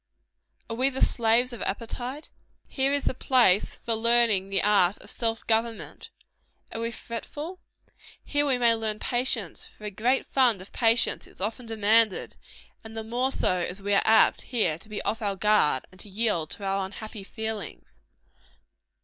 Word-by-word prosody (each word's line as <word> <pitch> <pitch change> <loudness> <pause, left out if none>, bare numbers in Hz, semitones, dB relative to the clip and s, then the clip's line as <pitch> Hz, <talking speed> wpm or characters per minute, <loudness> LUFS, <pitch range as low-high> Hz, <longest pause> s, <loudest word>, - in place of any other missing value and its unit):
Are 225 - -5
we 260 +3 +2
the 265 -1 +2
slaves 235 +2 +1
of 235 - -8
appetite? 245 +7 -5 0.3
Here 270 0 0
is 285 0 +1
the - - +1
place 245 -7 +3
for 230 - -2
learning 225 -4 +2
the 195 - 0
art 200 -2 +3
of - - -6
self 225 -1 -1
government. 225 0 -2 0.6
Are 225 - -5
we 230 - -2
fretful? 295 +10 -7 0.6
Here 290 0 0
we 260 -2 +2
may 235 -2 +4
learn 220 -1 -3
patience: 240 -6 0
for - - -17
a 210 - -4
great 240 +7 0
fund 245 -7 +2
of 185 - -13
patience 230 0 +4
is - - -19
often 225 +5 -4
demanded; 220 -1 +2 0.5
and 220 0 -10
the 220 - -3
more 245 +4 -1
so 185 - +1
as 180 +2 -3
we 205 +1 -2
are 200 - +4
apt, 220 0 +4
here, 180 -11 -1
to 215 - -14
be 210 - -5
off 225 - -2
our 200 -2 -1
guard, 195 -9 +2
and 185 - -19
to 205 - -8
yield 195 -6 -1
to 205 - -8
our 195 0 -1
unhappy 205 +2 -8
feelings. 215 - -7
225 Hz, 175 wpm, -26 LUFS, 200-240 Hz, 0.6 s, may